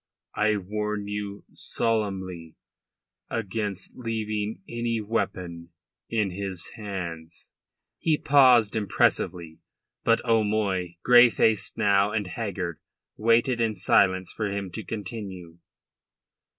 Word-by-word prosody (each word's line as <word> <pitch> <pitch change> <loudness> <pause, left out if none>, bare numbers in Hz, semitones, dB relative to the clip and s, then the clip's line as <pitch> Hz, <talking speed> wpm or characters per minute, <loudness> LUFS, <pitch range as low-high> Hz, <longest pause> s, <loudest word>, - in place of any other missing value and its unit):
I 105 0 +2
warn 105 +1 -3
you 105 -1 -5
solemnly 95 -7 -2 0.7
against 105 -3 -3
leaving 110 -3 -3
any 115 -1 -2
weapon 90 -6 -3 0.4
in 105 -4 0
his 95 -1 -4
hands." 85 -6 -7 0.5
He 160 -2 +2
paused 125 -8 +5
impressively. 85 -5 0 0.4
But 115 0 +4
O'Moy, 105 -6 +1
grey 120 0 +8
faced 110 -1 +1
now 100 -2 +3
and 105 -2 0
haggard, 90 -4 -4 0.4
waited 115 +2 +2
in 110 -2 +1
silence 95 -2 +3
for 110 - -2
him 100 -2 -4
to 110 - -5
continue. 95 -5 -7
105 Hz, 100 wpm, -26 LUFS, 95-115 Hz, 0.7 s, grey